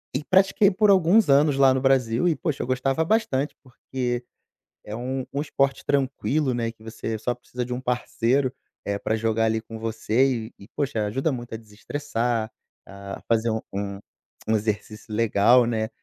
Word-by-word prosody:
e 140 - -1
pratiquei 195 +3 +4
por 210 +2 +3
alguns 190 +1 +4
anos 140 0 +4
lá 135 -1 +6
no 130 - 0
Brasil. 130 0 +2
E, 165 - +2
poxa, 155 -7 -2
eu - - -6
gostava 135 +4 +1
bastante 150 -9 0
porque 125 -1 -4 0.6
é 105 - -6
um 130 +2 -3
um 140 - -1
esporte 140 -2 0
tranquilo, 140 0 0
né, 115 -1 -1
que 110 -1 -21
você 110 0 -4
só 120 +3 -1
precisa 125 0 -6
de 125 - -4
um 125 - -4
parceiro, 125 +1 0 0.3
eh, 100 0 -1
pra 110 - 0
jogar 115 0 +1
ali 110 0 0
com 115 0 -9
você 115 +2 0
e - - -17
e, 100 - -13
poxa, 135 -7 -1
ajuda 135 +9 0
muito 120 -3 -6
a - - -4
desestressar, 115 +1 -3 0.4
a 100 0 -8
fazer 115 0 +2
um 110 - -1
um 100 0 -4 0.5
um 110 - +3
exercício 105 0 -3
legal, 115 +2 +4
né. 110 -2 -1
125 Hz, 180 wpm, -24 LUFS, 110-140 Hz, 0.6 s, lá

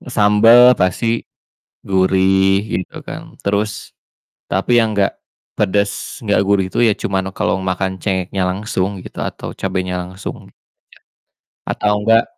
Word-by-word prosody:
sambel 115 +4 +6
pasti 115 +6 0 0.6
gurih 95 +1 +2 0.2
gitu 90 - -9
kan, - - -8
terus 100 +1 -2 0.6
tapi 95 +5 +1
yang 110 -1 +1
nggak 100 0 +2 0.4
pedes 100 0 -1
nggak 105 -1 +2
gurih 100 -2 +2
itu - - -1
ya 110 - +5
cuman 95 -1 -2
kalo 95 - 0
makan 95 0 -2
cengeknya 95 -1 -1
langsung 95 0 -2
gitu - - -10
atau - - -6
cabenya 95 -1 -2
langsung 95 +2 -7
gitu - - -23
ya. - - -92 1.1
Atau 105 0 0
enggak 115 0 +5
95 Hz, 130 wpm, -18 LUFS, 95-105 Hz, 1.1 s, sambel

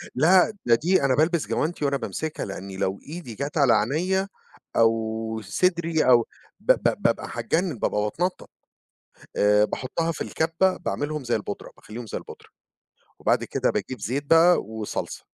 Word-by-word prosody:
لأ 180 +9 +5
ده 120 - +5
دي 175 +9 +2
أنا 130 -2 +3
بالبس 160 +1 +1
جوانتي 155 -1 -1
وأنا 140 0 +1
بامسكها، 155 +3 -4
لأنّي 95 0 -7
لو 95 +1 -1
إيدي 155 -8 -7
جات 145 +5 -4
على 135 -5 +5
عينيا 180 - +1 0.5
أو 110 0 +1
صدري 170 - +1
أو 120 -3 +5 0.3
ب - - +5
ب - - -1
بابقى - - +1
هاتجنن 165 - -1
بابقى 105 - 0
باتنطط، 170 - -2 0.9
آآ، 105 +1 +4
باحطها 165 +9 -2
في - - -7
الكَبّة 165 +4 +1
باعملهم 150 -1 -3
زي 120 - 0
البودرة، 100 -1 -5
باخلّيهم 115 +2 -9
زي - - -4
البودرة، - - -12 0.7
وبَعد - - +2
كده - - 0
باجيب 130 -3 -4
زيت 130 +9 -2
بقى 165 +4 +5
وصلصة، 110 0 -5
140 Hz, 150 wpm, -25 LUFS, 110-165 Hz, 0.9 s, لأ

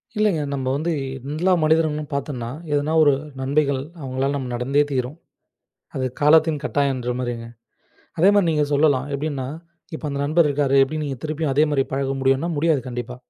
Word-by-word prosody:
இல்லைங்க 210 -7 +2
நம்ம 135 -2 -3
வந்து 160 +4 -1 0.4
எல்லா 175 +5 +1
மனிதர்களும் 155 -1 +1
பாத்தம்ன்னா 130 -4 -3 0.2
எதுனா 145 +2 0
ஒரு 145 - +5 0.3
நண்மைகள் 140 0 +1 0.2
அவங்களால 135 +1 -1
நம் 125 -3 -4
நடந்தே 135 +4 +2
தீரும். 130 +4 -2 0.8
அது 130 - -2 0.2
காலத்தின் 155 0 +4
கட்டாயம்ன்ற 130 -4 0
மாரிங்க. 120 -2 -4 0.7
அதே 190 +5 +6
மாரி 185 -4 +3
நீங்க 150 -2 +2
சொல்லலாம். 140 -2 +3
எப்டின்னா, 140 -3 -3 0.5
இப்ப 155 - -8
அந்த 140 - -3
நண்பர் 155 +1 +3
இருக்காரு. 140 -1 +1
எப்டி 155 +3 -4
நீங்க 135 -3 -4
திருப்பியும் 155 -1 -1
அதே 150 +2 +4
மாரி 135 -2 +2
பழக 135 0 -1
முடியும்னா, 135 +5 +2
முடியாது 155 -2 +2
கண்டிப்பா. 125 0 -5
145 Hz, 160 wpm, -22 LUFS, 130-155 Hz, 0.8 s, அதே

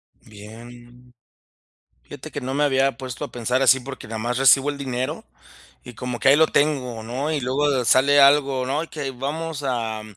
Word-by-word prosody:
Bien. 120 +4 -15 0.9
Fíjate 145 +2 -11
que 145 - -6
no 130 +1 -4
me 150 - +1
había 135 -1 +1
puesto 130 -3 -7
a - - -8
pensar 125 +2 -1
así, 130 0 +5
porque 135 -2 -9
nada 110 0 -6
más 120 +2 -3
recibo 135 +1 +4
el 145 - -7
dinero, 130 -2 -4 0.6
y 125 - -12
como 125 0 -5
que 135 - +2
ahí 140 - +6
lo 160 0 +5
tengo, 130 -6 -1
¿no? 130 +7 -4
Y 150 - -1
luego 135 0 0
sale 140 +2 +4
algo, 140 -2 +3
¿no?, 145 +5 -1
y - - -15
que 145 -3 -5
vamos 145 +4 -5
a 115 -4 -3
130 Hz, 190 wpm, -22 LUFS, 120-140 Hz, 0.9 s, ahí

